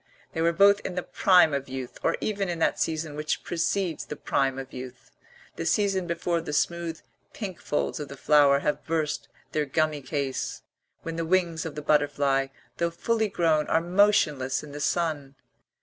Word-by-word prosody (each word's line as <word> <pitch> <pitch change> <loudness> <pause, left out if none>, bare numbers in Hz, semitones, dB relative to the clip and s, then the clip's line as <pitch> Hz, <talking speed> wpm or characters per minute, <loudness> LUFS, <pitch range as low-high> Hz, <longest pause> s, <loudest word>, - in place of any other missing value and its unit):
They 160 - -2
were 165 +1 +4
both 200 +4 +5
in 180 - -6
the 180 - -2
prime 180 -5 +4
of 140 -1 -2
youth, 130 -1 -6
or - - +1
even 200 -3 -1
in 170 - -2
that 165 - +1
season 155 -2 -2
which 150 +1 -2
precedes 175 0 -1
the - - -7
prime 135 -2 0
of 135 -1 -7
youth, 125 0 -9 0.5
the 165 - -3
season 195 0 +1
before 170 0 -1
the 150 - -6
smooth 170 +1 -1 0.3
pink 190 -6 -6
folds 150 - -1
of 150 - -5
the 140 +1 -10
flower 140 -1 +5
have 150 - -1
burst 155 -3 -2 0.2
their 150 -1 0
gummy 155 +1 0
case, 135 0 -3 0.4
when 165 0 -5
the 165 - -1
wings 170 -1 +1
of 155 - -8
the 150 - -5
butterfly, 145 -2 +2 0.3
though 170 - +1
fully 220 +6 0
grown, 160 -5 +2
are 160 - +3
motionless 165 -8 +2
in 150 - -10
the 145 - -7
sun. 145 -3 -1
160 Hz, 180 wpm, -27 LUFS, 145-175 Hz, 0.5 s, both